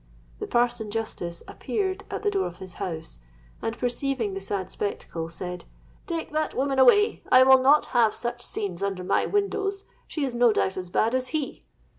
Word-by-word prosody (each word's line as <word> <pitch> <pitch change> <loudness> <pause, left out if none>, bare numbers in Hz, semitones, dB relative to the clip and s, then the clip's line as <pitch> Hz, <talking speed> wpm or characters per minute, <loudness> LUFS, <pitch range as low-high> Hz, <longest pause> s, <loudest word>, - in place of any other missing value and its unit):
The - - -4
parson 240 -2 +1
justice 190 -6 -4
appeared 395 -2 -3
at - - -4
the 415 - +2
door 390 -1 0
of 175 - -9
his 185 -2 -10
house; 160 - -5 0.4
and, 225 +1 -3
perceiving 245 -3 -1
the 195 - -4
sad 195 -1 -3
spectacle, 165 -5 -4
said, 180 +1 -6 0.4
'Take 330 -4 -3
that 310 0 -1
woman 270 0 +1
away: 410 - +5
I 255 0 +9
will 265 0 +7
not 285 +3 +5
have 230 -3 +4
such 240 0 -4
scenes 195 -6 -4
under 195 -2 -2
my - - +1
windows. 400 -1 -1 0.2
She 300 -3 -2
is 260 - -3
no 240 -2 +4
doubt 190 - 0
as 180 -1 -5
bad 220 +6 +1
as 255 0 0
he.' 300 +1 -3
240 Hz, 185 wpm, -26 LUFS, 195-285 Hz, 0.4 s, I